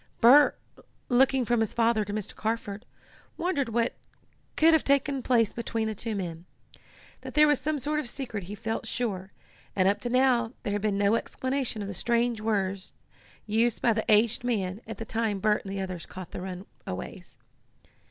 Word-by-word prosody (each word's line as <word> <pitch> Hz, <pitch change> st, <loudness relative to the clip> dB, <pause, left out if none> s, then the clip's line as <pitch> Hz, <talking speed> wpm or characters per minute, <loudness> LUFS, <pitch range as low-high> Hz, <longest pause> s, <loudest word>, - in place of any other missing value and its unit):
Bert, 275 Hz, +5 st, +7 dB, 0.5 s
looking 265 Hz, 0 st, +4 dB
from 240 Hz, 0 st, +2 dB
his 225 Hz, -2 st, 0 dB
father 230 Hz, -2 st, +3 dB
to 205 Hz, -, -6 dB
Mr. 210 Hz, -1 st, -4 dB
Carford, 220 Hz, -1 st, -3 dB, 0.5 s
wondered 315 Hz, -8 st, 0 dB
what 230 Hz, +1 st, 0 dB, 0.6 s
could 320 Hz, -, +5 dB
have 320 Hz, -, +6 dB
once -, -, -9 dB
taken 280 Hz, -1 st, +2 dB
place 235 Hz, -4 st, +2 dB
between 230 Hz, -1 st, -2 dB
the 220 Hz, -, -2 dB
two 220 Hz, +1 st, -4 dB
men. 170 Hz, -3 st, -5 dB, 0.8 s
That -, -, -9 dB
there 300 Hz, 0 st, +7 dB
was 295 Hz, -2 st, +2 dB
some 305 Hz, +3 st, -1 dB
sort 300 Hz, +3 st, -1 dB
of 260 Hz, -, -3 dB
secret 230 Hz, -7 st, -5 dB
he 205 Hz, +3 st, -7 dB
felt 225 Hz, +1 st, -4 dB
sure, 200 Hz, -6 st, -3 dB, 0.4 s
and 185 Hz, -1 st, +3 dB
up 200 Hz, -, +2 dB
to 240 Hz, -, -3 dB
now 250 Hz, -2 st, +3 dB
there 205 Hz, -, -2 dB
had 205 Hz, -, -1 dB
been 205 Hz, -1 st, 0 dB
no 200 Hz, +1 st, +3 dB
explanation 260 Hz, -2 st, -2 dB
of -, -, -5 dB
the 200 Hz, -, -5 dB
strange 235 Hz, +3 st, 0 dB
words 195 Hz, -3 st, -1 dB, 0.5 s
used 225 Hz, +2 st, +1 dB
by 230 Hz, -, +4 dB
the 220 Hz, +1 st, -1 dB
aged 220 Hz, +3 st, +4 dB
man 205 Hz, -4 st, -1 dB
at 225 Hz, -, -6 dB
the 225 Hz, -, -6 dB
time 225 Hz, -2 st, -1 dB
Bert 210 Hz, +1 st, +2 dB
and 195 Hz, -, -5 dB
the 195 Hz, 0 st, -3 dB
others 185 Hz, -3 st, -5 dB
caught 185 Hz, -1 st, -9 dB
the -, -, -6 dB
runaways. 185 Hz, +1 st, -8 dB
225 Hz, 190 wpm, -28 LUFS, 200-245 Hz, 0.8 s, Bert